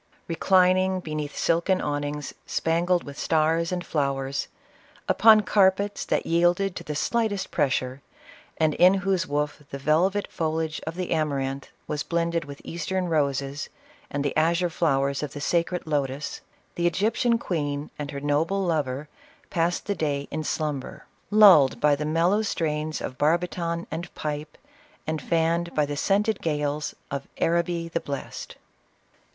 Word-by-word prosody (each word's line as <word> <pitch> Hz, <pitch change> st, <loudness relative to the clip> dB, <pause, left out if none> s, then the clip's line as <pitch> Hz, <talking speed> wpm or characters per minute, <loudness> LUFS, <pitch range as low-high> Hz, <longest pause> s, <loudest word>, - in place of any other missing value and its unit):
• -, -, -40 dB, 0.2 s
Reclining 185 Hz, +2 st, +3 dB
beneath 155 Hz, -3 st, -5 dB
silken 170 Hz, +3 st, +2 dB
awnings 145 Hz, -1 st, -3 dB
spangled 170 Hz, +2 st, +1 dB
with 140 Hz, 0 st, -9 dB
stars 165 Hz, +2 st, +1 dB
and 180 Hz, -1 st, -3 dB
flowers, 140 Hz, -2 st, -1 dB, 0.6 s
upon 220 Hz, 0 st, +6 dB
carpets 200 Hz, 0 st, +2 dB
that -, -, 0 dB
yielded 175 Hz, +3 st, +2 dB
to -, -, -6 dB
the 150 Hz, -, -5 dB
slightest 215 Hz, +4 st, 0 dB
pressure, 130 Hz, -3 st, 0 dB, 0.6 s
and 155 Hz, -1 st, +2 dB
in 180 Hz, +5 st, +6 dB
whose 190 Hz, -2 st, 0 dB
woof 150 Hz, +1 st, -2 dB
the 140 Hz, -, -5 dB
velvet 170 Hz, +8 st, +2 dB
foli 160 Hz, 0 st, 0 dB
age 155 Hz, 0 st, -6 dB
of 160 Hz, -, -3 dB
the 180 Hz, -1 st, -4 dB
amaranth 140 Hz, -4 st, -1 dB, 0.2 s
was 150 Hz, -1 st, -3 dB
blended 170 Hz, -1 st, -1 dB
with 140 Hz, -1 st, -10 dB
Eastern 180 Hz, +2 st, -2 dB
roses, 140 Hz, -2 st, -1 dB, 0.4 s
and 145 Hz, 0 st, -2 dB
the 140 Hz, -, -1 dB
azure 170 Hz, +3 st, +2 dB
flowers 140 Hz, -4 st, +1 dB
of 150 Hz, -3 st, -4 dB
the 145 Hz, -, -6 dB
sacred 170 Hz, +4 st, 0 dB
lotus, 140 Hz, -2 st, -2 dB, 0.3 s
the 175 Hz, 0 st, +1 dB
Egyptian 225 Hz, +7 st, +2 dB
queen 145 Hz, -8 st, -3 dB
and 145 Hz, -1 st, -4 dB
her 140 Hz, -1 st, -5 dB
noble 155 Hz, +7 st, 0 dB
lover 150 Hz, -5 st, -1 dB, 0.4 s
passed 170 Hz, +1 st, 0 dB
the 205 Hz, -, 0 dB
day 145 Hz, -5 st, -2 dB
in 155 Hz, -, -3 dB
slumber, 150 Hz, -3 st, -3 dB, 0.2 s
lulled 195 Hz, -10 st, +7 dB
by 150 Hz, -1 st, +4 dB
the 150 Hz, +1 st, -4 dB
mellow 170 Hz, +7 st, +2 dB
strains 155 Hz, -6 st, -2 dB
of 130 Hz, -, -6 dB
barbiton 170 Hz, +2 st, 0 dB
and 170 Hz, +2 st, -5 dB
pipe, 150 Hz, 0 st, -4 dB, 0.5 s
and 155 Hz, -1 st, -2 dB
fanned 170 Hz, +1 st, 0 dB
by 150 Hz, -, +3 dB
the 145 Hz, 0 st, -4 dB
scented 205 Hz, +6 st, +1 dB
gales 150 Hz, -1 st, -1 dB, 0.2 s
of 140 Hz, 0 st, -4 dB
" -, -, -24 dB
Araby 170 Hz, 0 st, +1 dB
the 170 Hz, 0 st, -2 dB
Blest." 140 Hz, -3 st, -6 dB
At -, -, -23 dB
CLEOPATRA. -, -, -29 dB
160 Hz, 155 wpm, -25 LUFS, 145-175 Hz, 0.6 s, lulled